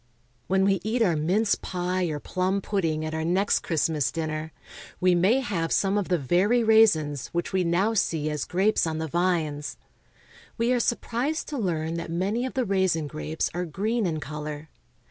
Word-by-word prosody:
When 190 Hz, 0 st, +2 dB
we 195 Hz, -3 st, +2 dB
eat 225 Hz, +3 st, +1 dB
our 175 Hz, -6 st, +2 dB
mince 190 Hz, +8 st, +2 dB
pie 180 Hz, 0 st, -2 dB
or 155 Hz, -3 st, -3 dB
plum 185 Hz, +5 st, -1 dB
pudding 165 Hz, -6 st, -1 dB
at 155 Hz, -, -4 dB
our 160 Hz, 0 st, -2 dB
next 185 Hz, +5 st, +2 dB
Christmas 155 Hz, -5 st, 0 dB
dinner, 155 Hz, -1 st, -3 dB, 0.5 s
we 180 Hz, 0 st, +4 dB
may 195 Hz, +10 st, +3 dB
have 175 Hz, -9 st, -2 dB
some 195 Hz, 0 st, +2 dB
of 205 Hz, -3 st, 0 dB
the 180 Hz, -, +3 dB
very 185 Hz, -, +2 dB
raisins 165 Hz, -, +4 dB
which 175 Hz, +1 st, -3 dB
we 190 Hz, -1 st, +2 dB
now 180 Hz, +6 st, +1 dB
see 160 Hz, -7 st, 0 dB
as 150 Hz, -2 st, -2 dB
grapes 190 Hz, 0 st, +1 dB
on 160 Hz, -1 st, -2 dB
the 160 Hz, 0 st, -3 dB
vines. 160 Hz, -3 st, -1 dB, 0.8 s
We 235 Hz, +2 st, +2 dB
are 245 Hz, -, +2 dB
sur 235 Hz, -, +2 dB
prised 270 Hz, +9 st, -3 dB
to 295 Hz, -, -4 dB
learn 165 Hz, -5 st, -1 dB
that 165 Hz, 0 st, -5 dB
many 200 Hz, +9 st, -1 dB
of -, -, -9 dB
the 255 Hz, -2 st, +1 dB
raisin 190 Hz, -5 st, +1 dB
grapes 155 Hz, +2 st, -3 dB
are 175 Hz, +2 st, -2 dB
green 210 Hz, +6 st, -1 dB
in 160 Hz, -2 st, -2 dB
color. 150 Hz, +1 st, -6 dB
180 Hz, 185 wpm, -26 LUFS, 160-205 Hz, 0.8 s, we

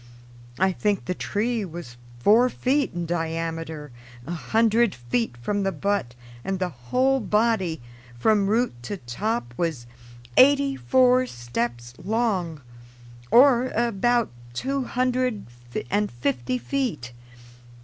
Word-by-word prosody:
I 190 Hz, 0 st, +3 dB
think 205 Hz, +2 st, -1 dB
the 180 Hz, -, -1 dB
tree 220 Hz, +4 st, -1 dB
was 170 Hz, -9 st, -8 dB, 0.2 s
four 220 Hz, -, +5 dB
feet 275 Hz, +3 st, 0 dB
in 175 Hz, -1 st, -2 dB
diameter 165 Hz, -2 st, -3 dB, 0.3 s
a 165 Hz, -, -6 dB
hundred 225 Hz, +5 st, +2 dB
feet 120 Hz, -1 st, -2 dB
from 200 Hz, +13 st, -2 dB
the 195 Hz, 0 st, 0 dB
butt, 200 Hz, -12 st, -1 dB, 0.3 s
and 195 Hz, 0 st, -2 dB
the 185 Hz, -1 st, -1 dB
whole 250 Hz, -, +1 dB
body, 210 Hz, -, +1 dB, 0.3 s
from 205 Hz, -, +3 dB
root 235 Hz, +4 st, +1 dB
to 200 Hz, +12 st, -5 dB
top, 125 Hz, -, -3 dB
was 160 Hz, -8 st, -2 dB, 0.5 s
eighty 280 Hz, 0 st, +5 dB
four 255 Hz, -1 st, +3 dB
steps 120 Hz, -, -4 dB
long, 190 Hz, -7 st, -1 dB, 0.7 s
or 255 Hz, 0 st, +6 dB
about 235 Hz, +1 st, +1 dB, 0.2 s
two 270 Hz, -, -1 dB
hundred 250 Hz, -3 st, 0 dB, 0.5 s
and 205 Hz, 0 st, +1 dB
fifty 125 Hz, -, -1 dB
feet. 235 Hz, -, -3 dB
200 Hz, 120 wpm, -24 LUFS, 160-240 Hz, 0.7 s, or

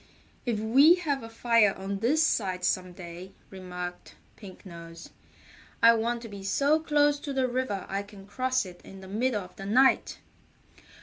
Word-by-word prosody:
"If 230 Hz, -3 st, 0 dB
we 270 Hz, +10 st, +6 dB
have 300 Hz, -7 st, -2 dB
a 225 Hz, -, -9 dB
fire 225 Hz, -3 st, +3 dB
on 195 Hz, +1 st, -4 dB
this 285 Hz, +9 st, +2 dB
side 185 Hz, -, 0 dB
some 185 Hz, -1 st, 0 dB
day," 175 Hz, +1 st, -10 dB, 0.2 s
remarked 180 Hz, -2 st, -8 dB, 0.2 s
Pink 195 Hz, -3 st, -13 dB
Nose, 170 Hz, -1 st, -11 dB, 0.7 s
"I 230 Hz, 0 st, +9 dB
want 230 Hz, +1 st, -1 dB
to -, -, -7 dB
be 200 Hz, -2 st, -9 dB
so 280 Hz, +10 st, +2 dB
close 295 Hz, -2 st, +2 dB
to 285 Hz, -, -6 dB
the 260 Hz, -1 st, +1 dB
river 245 Hz, -6 st, -2 dB
I 195 Hz, +1 st, -2 dB
can 200 Hz, -1 st, -13 dB
cross 255 Hz, +3 st, -1 dB
it 180 Hz, -1 st, -12 dB
in 195 Hz, 0 st, -12 dB
the 190 Hz, -, -11 dB
middle 215 Hz, +1 st, -1 dB
of 180 Hz, -, -15 dB
the 195 Hz, -, -7 dB
night." 260 Hz, +6 st, +3 dB
210 Hz, 175 wpm, -28 LUFS, 190-255 Hz, 0.7 s, I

